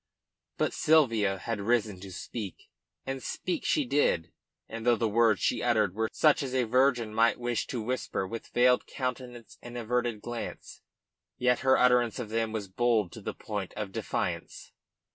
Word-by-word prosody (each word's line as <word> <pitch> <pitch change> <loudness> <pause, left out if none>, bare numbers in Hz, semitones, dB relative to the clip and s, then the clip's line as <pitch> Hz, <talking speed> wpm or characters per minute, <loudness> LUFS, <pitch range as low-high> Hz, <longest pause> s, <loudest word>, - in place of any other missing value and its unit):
But - - 0
Sylvia 115 -11 +3
had 105 +2 -4
risen 110 -3 +1
to 95 0 -9
speak, 100 +2 -7 0.3
and 135 0 -4
speak 180 - -3
she 300 -3 +1
did, 145 - +1 0.4
and 115 0 -7
though 120 0 +4
the 115 0 0
words 110 -1 +3
she - - +1
uttered 110 -6 +2
were 110 +1 -1
such 150 -2 +3
as 130 -2 -3
a 130 - +3
virgin 125 -2 +2
might 115 +2 +3
wish 120 -1 -1
to 120 -4 -3
whisper 125 -4 -2
with 115 +4 -7
veiled 125 +1 +3
countenance 125 -2 -5
and 120 0 -8
averted 120 -1 -1
glance, 120 -1 -7 0.6
yet 125 0 +2
her 130 0 +4
utterance 125 -2 +3
of 120 -4 -5
them 115 0 -1
was 110 -3 -4
bold 110 -2 +1
to - - -10
the - - -5
point 105 -3 -5
of 105 -2 -4
defiance. - - -4
115 Hz, 170 wpm, -29 LUFS, 110-125 Hz, 0.6 s, though